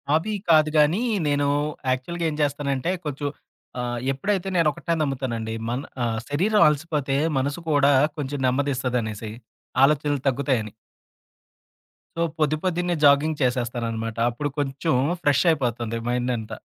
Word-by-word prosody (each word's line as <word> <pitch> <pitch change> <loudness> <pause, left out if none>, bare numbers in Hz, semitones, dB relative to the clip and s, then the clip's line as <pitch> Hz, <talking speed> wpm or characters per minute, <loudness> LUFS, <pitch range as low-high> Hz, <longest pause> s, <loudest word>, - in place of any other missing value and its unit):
అబీ 175 +7 0 0.2
కాదు 155 -2 +6
గానీ 155 +8 +4 0.3
నేను 145 0 +1 0.4
యాక్చువల్‌గా 165 +7 -2
ఏం - - -5
చేస్తానంటే 140 +1 -1
కొంచెం 145 0 -3 0.5
ఆహ్, 120 -1 -2
ఎప్పుడైతే 190 +8 -1
నేనొకటే 165 0 +1
నమ్ముతానండి. 125 -6 -2
మన 120 +3 -2 0.2
ఆహ్ 115 -1 -1
శరీరం 195 +9 +2
అలసిపోతే 150 -2 0 0.2
మనసు 140 +4 -1
కూడా 145 -2 +4 0.3
కొంచెం 145 -1 -3
నెమ్మదిస్తదనేసి. 125 -5 -1 0.5
ఆలోచనలు 145 -1 +2
తగ్గుతాయని. 130 -5 0 1.5
సో, - - 0 0.2
పొద్ది 155 0 +2
పొద్దన్నే 175 -1 0
జాగింగ్ 145 +2 +4
చేసేస్తాననమాట. 115 -3 -1
అప్పుడు 145 +5 -3
కొంచెం 140 +3 -1 0.3
ఫ్రెష్ 145 -3 +3
అయిపోతుంది 120 -6 -1
మైండంతా. 120 -3 -2
140 Hz, 115 wpm, -24 LUFS, 125-150 Hz, 1.5 s, కాదు